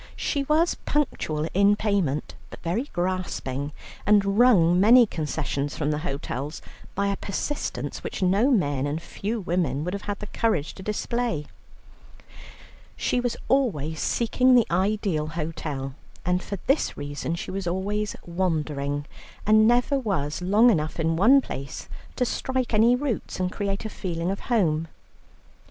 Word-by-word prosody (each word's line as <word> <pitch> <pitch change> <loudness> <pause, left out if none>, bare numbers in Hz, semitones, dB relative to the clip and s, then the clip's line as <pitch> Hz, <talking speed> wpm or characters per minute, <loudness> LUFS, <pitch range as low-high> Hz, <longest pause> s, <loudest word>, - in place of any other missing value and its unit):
She 285 - -1
was 315 +4 +3
punctual 160 - -1
in 200 +2 +5
payment, 195 -10 0 0.2
but - - -10
very 185 +10 -1
grasping, 175 -6 -2 0.3
and 200 0 +3
wrung 180 -8 +6
many 235 +5 +7
concessions 150 - -3
from 150 -1 0
the 150 - -1
hotels 145 -1 -4 0.4
by 200 - +1
a 200 - 0
persistence 245 +10 -4
which - - -3
no 200 +8 +3
men 145 - +1
and 150 +2 -2
few 210 +6 -4
women 165 -6 0
would 180 +3 -3
have 200 - -3
had 205 - -1
the 210 - -7
courage 205 -8 0
to - - -11
display. 215 -3 -2 1.5
She 250 - 0
was 245 -1 -1
always 160 - +1
seeking 250 +2 +3
the 240 -3 +5
ideal 185 -4 +1
hotel, 155 -4 -4 0.3
and 180 +1 +1
for 200 - -5
this 275 +3 +1
reason 145 +3 -3
she - - -5
was 190 -1 -4
always 205 +4 -1
wandering, 150 -5 -1 0.4
and 215 +1 +6
never 245 +4 +3
was 180 - -2
long 210 +7 +5
enough 155 -4 -1
in 165 0 +1
one 245 +11 +6
place 135 - -7 0.3
to 250 - +1
strike 255 0 -2
any 230 +3 +5
roots 250 -7 -3
and 185 0 0
create 200 +1 -3
a - - -2
feeling 175 -3 -3
of 195 - -3
home. 165 -9 +2
190 Hz, 150 wpm, -25 LUFS, 155-220 Hz, 1.5 s, many